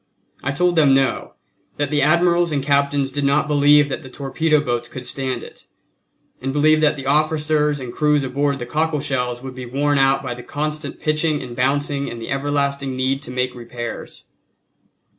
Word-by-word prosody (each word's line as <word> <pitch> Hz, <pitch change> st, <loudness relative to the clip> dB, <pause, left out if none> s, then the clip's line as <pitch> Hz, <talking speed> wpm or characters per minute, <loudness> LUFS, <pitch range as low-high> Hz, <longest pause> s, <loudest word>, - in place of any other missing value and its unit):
I 135 Hz, -, -1 dB
told 175 Hz, +4 st, +1 dB
them 140 Hz, -4 st, +5 dB
no, 135 Hz, -1 st, 0 dB, 0.4 s
that 145 Hz, -1 st, -1 dB
the 145 Hz, -1 st, +2 dB
admirals 170 Hz, +2 st, +3 dB
and 140 Hz, -2 st, -1 dB
captains 140 Hz, -1 st, +1 dB
did 145 Hz, +1 st, -2 dB
not 140 Hz, +2 st, +2 dB
believe 145 Hz, 0 st, +5 dB
that 135 Hz, -, -4 dB
the 130 Hz, -, -11 dB
torpedo 150 Hz, +4 st, 0 dB
boats 120 Hz, -4 st, -2 dB
could 130 Hz, -1 st, -8 dB
stand 130 Hz, 0 st, -3 dB
it, -, -, -13 dB, 0.7 s
and 135 Hz, +1 st, -2 dB
believed 155 Hz, +2 st, +3 dB
that 150 Hz, -1 st, +3 dB
the 135 Hz, -2 st, -7 dB
officers 150 Hz, 0 st, +2 dB
and 125 Hz, -2 st, -7 dB
crews 150 Hz, -2 st, +2 dB
aboard 140 Hz, +2 st, 0 dB
the 120 Hz, -, -5 dB
cockle 155 Hz, +3 st, 0 dB
shells 125 Hz, -3 st, -2 dB
would 130 Hz, -1 st, -7 dB
be 130 Hz, -1 st, -8 dB
worn 145 Hz, +3 st, +1 dB
out 135 Hz, 0 st, +3 dB
by 125 Hz, -2 st, -3 dB
the 125 Hz, -, -9 dB
constant 150 Hz, +3 st, -4 dB
pitching 155 Hz, 0 st, +1 dB
and 120 Hz, -2 st, -8 dB
bouncing 140 Hz, +2 st, 0 dB
and 120 Hz, -, -7 dB
the 115 Hz, -, -6 dB
everlasting 140 Hz, -1 st, -1 dB
need 130 Hz, +1 st, 0 dB
to 140 Hz, -, -8 dB
make 125 Hz, 0 st, -1 dB
repairs. 120 Hz, -1 st, -8 dB
140 Hz, 185 wpm, -20 LUFS, 130-150 Hz, 0.7 s, them